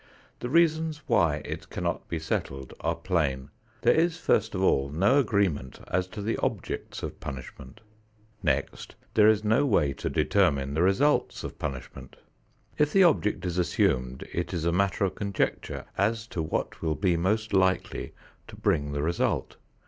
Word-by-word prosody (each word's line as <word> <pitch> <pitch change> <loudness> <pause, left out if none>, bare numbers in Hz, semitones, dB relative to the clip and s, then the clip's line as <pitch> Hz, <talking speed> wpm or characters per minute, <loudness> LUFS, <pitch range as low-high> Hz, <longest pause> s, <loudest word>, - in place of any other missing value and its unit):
The 120 - -4
reasons 160 -1 +2
why 80 -5 +2
it - - -6
cannot - - -3
be 85 - -3
settled 70 -4 -3
are - - -1
plain. 70 -8 -1 0.3
There - - +6
is 165 +1 +2
first 110 - +1
of 95 - -1
all 70 -6 +3
no 100 - +3
agreement 100 - 0
as 90 0 0
to 100 +2 -7
the 115 +2 -1
objects - - -3
of - - -5
punishment. 65 +4 -9 0.6
Next - - -2 0.2
there 105 -1 +6
is 110 -1 +4
no 110 +6 +3
way 75 - +2
to - - -4
determine 70 -9 +2
the 80 - +1
results 95 +12 +2
of - - -7
punishment. 65 -2 -6 0.6
If 150 0 +3
the 195 +2 +6
object 140 - +2
is 90 0 -1
assumed 65 -7 0
it 85 +2 -2
is 85 -1 -2
a 85 - +2
matter 100 +2 +1
of 95 - -2
conjecture 100 0 -2
as 110 +2 +1
to 85 - -3
what 80 - -3
will 80 -2 0
be 90 -1 +1
most 105 +6 0
likely 95 -1 +1 0.3
to - - -11
bring 70 -1 0
the 70 0 -1
result. 85 +2 -1
95 Hz, 165 wpm, -27 LUFS, 75-110 Hz, 0.6 s, There